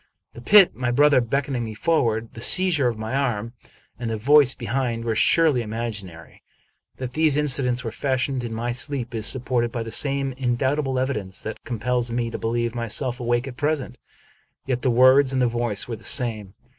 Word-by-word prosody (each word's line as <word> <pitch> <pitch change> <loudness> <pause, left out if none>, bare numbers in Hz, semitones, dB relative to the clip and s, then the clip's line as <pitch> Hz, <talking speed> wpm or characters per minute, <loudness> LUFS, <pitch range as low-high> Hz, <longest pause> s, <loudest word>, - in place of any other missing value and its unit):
The 120 - -11
pit, 195 - +6
my 125 -1 -2
brother 140 +1 +4
beckoning 130 +1 -2
me 110 -1 -6
forward, 115 -6 0
the 115 - -10
seizure 175 -4 +2
of 115 -2 -2
my 110 +2 -5
arm, 120 -5 -2 0.5
and 120 -2 -4
tiie 110 - -2
voice 140 +3 +4
behind, 120 -1 -3
were 115 - 0
surely 150 +3 +4
imag 110 -1 -4
inary. 85 -3 -14 0.6
That 125 -1 -6
these 155 -1 +2
incidents 125 -4 +1
were 115 - -4
fashioned 130 +1 -2
in 120 - -5
my 115 +2 -3
sleep 125 -1 -4
is 110 -1 -1
supported 125 -2 -1
by 115 -1 -4
the 115 - -8
same 140 +2 0
indubitable 130 +2 -1
evidence 105 -8 -2
that 110 - -7
compels 120 +1 -2
me 115 -1 -2
to - - -5
believe 115 0 -2
myself 120 +2 -2
awake 120 +1 -1
at 125 -2 -9
present; 145 -4 -2 0.7
yet 125 -2 -2
the 130 - +1
words 130 +3 +5
and 130 - 0
the 125 - +3
voice 120 -3 -1
were 115 -2 -5
the 105 - -17
same. 110 -8 +1
125 Hz, 190 wpm, -23 LUFS, 115-135 Hz, 0.7 s, pit